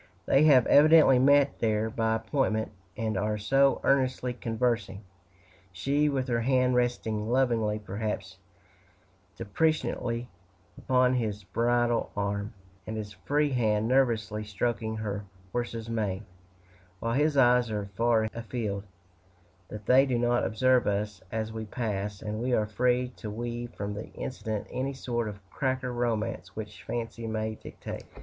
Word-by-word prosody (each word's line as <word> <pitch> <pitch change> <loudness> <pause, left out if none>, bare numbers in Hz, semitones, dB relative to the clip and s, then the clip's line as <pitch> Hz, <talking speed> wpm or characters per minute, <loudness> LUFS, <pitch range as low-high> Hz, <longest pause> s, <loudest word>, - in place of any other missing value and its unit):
They 140 +3 +4
have 130 -6 +6
evidently 150 -3 +7
met 140 +1 +4
there 110 -1 +1
by 110 -1 +1
appointment, 110 -1 -1 0.3
and 110 -1 -1
are 105 +1 0
so 135 +6 +3
earnestly 130 -2 +1
conversing 115 -4 -1 0.7
she 140 +10 +1
with 135 -2 -1
her 120 -2 0
hand 125 +1 +2
resting 115 -3 0
lovingly, 115 -4 +2
perhaps 100 -2 -5 1.0
deprecatingly, 120 -1 -1 0.5
upon 125 -1 +2
his 110 -4 -2
bridle 120 +3 +1
arm, 100 0 -2 0.3
and 110 0 -4
his 105 -1 -6
free 145 +9 0
hand 110 -4 +1
nervously 115 -5 +1
stroking 110 +2 -2
her 105 -1 -3 0.3
horse's 115 -2 -3
mane, 110 -3 -2 0.7
while 115 +3 -1
his 145 +2 +2
eyes 125 -2 +5
are 105 -2 -2
far 115 0 +3
afield 110 -4 -4 0.8
that 105 -1 -9
they 135 +2 +5
do 125 -2 +1
not 120 0 +2
observe 130 +3 +2
us 105 -1 -1
as 110 0 -3
we 110 0 -5
pass; 105 -3 -3
and 110 +1 -3
we 125 +1 0
are 110 - +3
free 125 +3 +1
to 110 - -6
weave 120 +2 -4
from 100 0 -4
the 105 +2 -6
incident 110 -5 -4
any 135 +2 -2
sort 120 -3 -2
of 100 -2 -9
cracker 130 -2 -1
romance 120 -3 -2
which 110 -1 -7
fancy 115 0 -4
may 110 0 -2
dictate. - - -8
115 Hz, 140 wpm, -28 LUFS, 105-125 Hz, 1.0 s, evidently